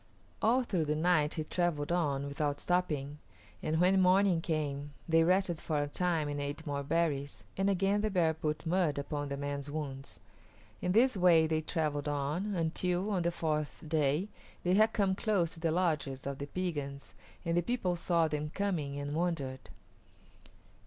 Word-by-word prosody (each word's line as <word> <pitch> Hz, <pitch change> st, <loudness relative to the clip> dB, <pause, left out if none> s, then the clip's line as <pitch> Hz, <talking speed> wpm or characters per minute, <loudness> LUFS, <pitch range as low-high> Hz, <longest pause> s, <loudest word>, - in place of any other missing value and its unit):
All 245 Hz, +4 st, +3 dB
through 185 Hz, -9 st, 0 dB
the 150 Hz, 0 st, 0 dB
night 155 Hz, -2 st, +2 dB
he 155 Hz, -, -2 dB
travelled 165 Hz, -2 st, -1 dB
on 145 Hz, -6 st, 0 dB
without 145 Hz, 0 st, -2 dB
stopping, 150 Hz, -5 st, -1 dB, 0.4 s
and 160 Hz, +1 st, 0 dB
when 185 Hz, +2 st, +4 dB
morning 185 Hz, -1 st, +4 dB
came 145 Hz, -3 st, -3 dB
they 165 Hz, 0 st, +4 dB
rested 180 Hz, -1 st, +2 dB
for 155 Hz, -3 st, -2 dB
a -, -, -3 dB
time 165 Hz, 0 st, 0 dB
and 145 Hz, 0 st, -3 dB
ate 145 Hz, +3 st, -4 dB
more 140 Hz, -2 st, -2 dB
berries, 145 Hz, -2 st, -1 dB
and 195 Hz, +1 st, +1 dB
again 195 Hz, +2 st, +2 dB
the 215 Hz, -, 0 dB
bear 170 Hz, -5 st, +2 dB
put 155 Hz, 0 st, -3 dB
mud 165 Hz, -3 st, +1 dB
upon 145 Hz, 0 st, -3 dB
the 140 Hz, -, -3 dB
man's 140 Hz, 0 st, -4 dB
wounds. 140 Hz, -3 st, -6 dB, 0.6 s
In 180 Hz, -, 0 dB
this 250 Hz, +4 st, +4 dB
way 175 Hz, -4 st, +5 dB
they 155 Hz, 0 st, 0 dB
travelled 150 Hz, -3 st, -2 dB
on, 150 Hz, +8 st, -1 dB
until, 180 Hz, +4 st, 0 dB
on 190 Hz, -3 st, +1 dB
the 170 Hz, 0 st, +1 dB
fourth 155 Hz, -1 st, -2 dB
day, 150 Hz, +3 st, +1 dB, 0.4 s
they 180 Hz, -, +2 dB
had 215 Hz, +3 st, +5 dB
come 200 Hz, -4 st, +1 dB
close 190 Hz, -5 st, +1 dB
to -, -, -11 dB
the 165 Hz, 0 st, 0 dB
lodges 155 Hz, -6 st, 0 dB
of 140 Hz, 0 st, -4 dB
the 140 Hz, -, -4 dB
Piegans 145 Hz, -6 st, -4 dB, 0.3 s
and 170 Hz, 0 st, 0 dB
the 175 Hz, -, +3 dB
people 185 Hz, -3 st, -1 dB
saw 170 Hz, -1 st, +2 dB
them 150 Hz, 0 st, -3 dB
coming, 160 Hz, -7 st, -2 dB
and 145 Hz, 0 st, -4 dB
wondered. 150 Hz, -6 st, -2 dB
160 Hz, 175 wpm, -32 LUFS, 145-180 Hz, 0.6 s, way